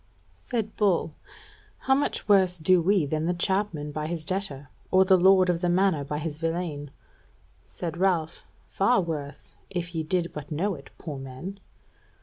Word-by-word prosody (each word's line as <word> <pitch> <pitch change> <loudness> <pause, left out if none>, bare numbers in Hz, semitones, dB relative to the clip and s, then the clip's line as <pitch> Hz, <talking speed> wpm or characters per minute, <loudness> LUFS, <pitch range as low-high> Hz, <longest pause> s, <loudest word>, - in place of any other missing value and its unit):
Said 225 -4 -3
Bull: 185 -6 +2 0.7
"How 265 - +3
much 280 -4 0
worse 190 -3 +4
do 175 +2 +4
we 185 -1 +3
than 155 +3 -1
the 175 - +1
chapmen 175 -5 -1
by 150 +1 -3
his 165 -1 -4
debtor, 150 -7 -3 0.2
and 190 0 +5
the 190 - +7
lord 185 0 +5
of 175 -1 0
the 175 - +1
manor 180 -4 +2
by 150 +1 -4
his 155 0 -4
villein?" 165 -3 -3 0.8
Said 170 -1 -5
Ralph: 175 -3 0 0.2
"Far 240 +6 +2
worse, 155 -5 -5 0.2
if 175 -2 -4
ye 165 - -1
did 170 +2 -1
but 150 -3 -7
know 190 +7 0
it, 140 -4 -11
poor 150 -5 -6
men!" 135 +10 -8
175 Hz, 165 wpm, -26 LUFS, 155-190 Hz, 0.8 s, the